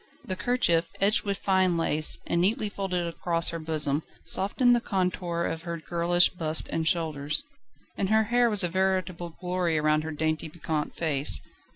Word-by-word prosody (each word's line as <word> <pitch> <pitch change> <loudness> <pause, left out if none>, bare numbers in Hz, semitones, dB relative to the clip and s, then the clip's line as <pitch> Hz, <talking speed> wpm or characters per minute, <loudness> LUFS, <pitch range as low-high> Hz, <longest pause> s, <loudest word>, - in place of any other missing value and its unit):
The 185 - -3
kerchief, 180 -8 +1
edged 205 +3 +2
with 200 -1 -1
fine 185 -3 +1
lace, 155 -2 +4
and 170 - 0
neatly 210 +3 +1
folded 185 -3 -3
across 170 0 0
her 165 - -5
bosom, 155 -2 -1 0.2
softened 245 +5 +2
the 240 - 0
contour 180 -4 -2
of 165 - -3
her 170 0 -5
girlish 175 +2 +3
bust 160 -3 -2
and 160 -1 -1
shoulders. 155 - -1 0.5
And 195 - -1
her 220 +1 +4
hair 240 +2 +2
was 210 -3 +2
a - - +2
veritable 185 -2 -2
glory 180 -3 -1
round 155 0 +1
her 160 - -5
dainty, 155 +1 -2
piquant 155 -1 -4
face. 140 - +2
170 Hz, 170 wpm, -27 LUFS, 160-190 Hz, 0.5 s, lace